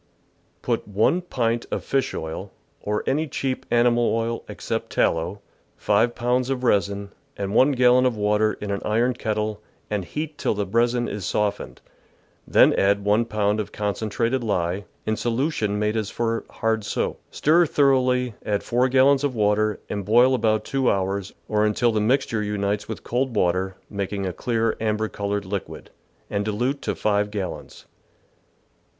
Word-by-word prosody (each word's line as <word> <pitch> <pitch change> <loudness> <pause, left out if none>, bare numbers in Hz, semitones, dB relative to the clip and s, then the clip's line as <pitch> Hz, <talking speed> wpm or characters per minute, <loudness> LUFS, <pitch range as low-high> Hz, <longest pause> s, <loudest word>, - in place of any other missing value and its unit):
— - - -40
Put - - -1
1 110 - +2
pint 120 -8 -1
of - - -3
fish 135 -1 -1
oil, 80 0 -5 0.3
or 105 0 -2
any 155 +4 0
cheap 135 -2 -3
animal 120 -1 +3
oil 115 0 -2
except - - -4
tallow, 85 +5 0 0.4
5 120 0 +2
pounds 125 +1 0
of 130 -2 -2
resin, 100 -3 +1 0.3
and 100 0 -3
1 135 +5 +5
gallon 125 0 +5
of 120 -3 -2
water 105 +1 +2
in 105 -1 -5
an 100 - -2
iron 115 +4 +1
kettle, 105 -2 -2 0.3
and 105 -2 -1
heat 150 - -5
till - - 0
the 100 0 -1
resin 120 +4 +1
is 105 -1 -5
softened, 100 -12 -2 0.7
then - - +5
add 100 +1 +2
1 105 +3 +3
pound 105 -1 0
of 105 - -4
concentrated 110 +4 -1
lye, 95 -2 -1 0.2
in 110 - 0
solution 115 -3 -1
made 105 +1 0
as 110 -2 -1
for 115 -1 -2
hard 110 -1 -1
soap; - - -2
stir 165 +3 +3
thoroughly, 130 -4 +2
add 100 -1 -1
4 125 +2 +1
gallons 135 +2 +4
of 140 -3 0
water, 105 -1 +1
and 100 -1 -3
boil 120 +6 +5
about 110 -3 +1
two 135 -2 +1
hours, 95 0 -1 0.2
or 105 -1 +1
until 110 +3 +2
the 110 -1 0
mixture 115 -1 +1
unites 105 0 -2
with 110 - -6
cold 125 0 -1
water, 95 0 +1
making 100 0 -3
a 90 - -2
clear 115 0 0
amber 110 0 0
coloured 100 -1 -3
liquid, 100 0 -6 0.4
and 100 0 -1
dilute 120 +7 -1
to - - -2
5 105 -1 +1
gallons. 100 -4 -6
110 Hz, 165 wpm, -23 LUFS, 100-125 Hz, 0.7 s, 1